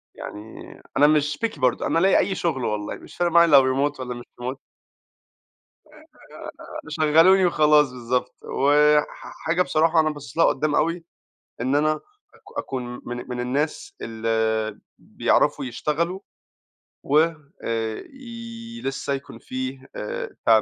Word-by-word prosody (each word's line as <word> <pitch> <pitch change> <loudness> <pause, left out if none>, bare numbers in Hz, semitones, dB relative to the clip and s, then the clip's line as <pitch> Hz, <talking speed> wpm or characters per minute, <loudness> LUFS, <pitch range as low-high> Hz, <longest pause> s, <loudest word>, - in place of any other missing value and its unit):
يعني 105 +2 -9 0.2
أنا 145 - +7
مش 150 -1 +2
Picky 220 - -4
برضو، 125 -2 +1
أنا 165 - +2
ألاقي 190 +3 +4
أي 190 +1 +1
شغل 150 -9 -1
والله، 105 -1 -2
مش - - -14
فارق 175 -1 +1
معايا 170 0 +6
لو 140 -4 +8 0.3
Remote 145 - -19
والّا 125 -1 -4
مش 120 0 -9 0.2
Remote. 130 +2 -3 2.1
آآ - - -9
شغّلوني 165 +5 +5
وخلاص 150 -4 +4
بالضبط، 125 0 -2
وح 150 +2 +4 0.4
حاجة 170 +2 +2
بصراحة 165 -1 +3
أنا 155 -1 +3
باصص 145 -4 -9
لها 165 - +6
قدّام 150 +1 +1
أوي 165 +2 +1 0.6
إن 130 +4 +1
أنا 155 +1 +3 0.4
أك - - -13
أكون 125 -2 -4
من 120 0 -6
من 125 -1 -4
الناس 140 +5 -2
اللي 110 -1 -1 0.2
بيعرفوا - - +1
يشتغلوا 155 +9 -2 0.8
وي 160 +3 +3 1.5
لسه 135 +1 -2
يكون 135 -1 -6
فيه 130 +1 -6
آآ 105 - -4 0.2
ت - - 0
145 Hz, 135 wpm, -24 LUFS, 125-160 Hz, 2.1 s, لو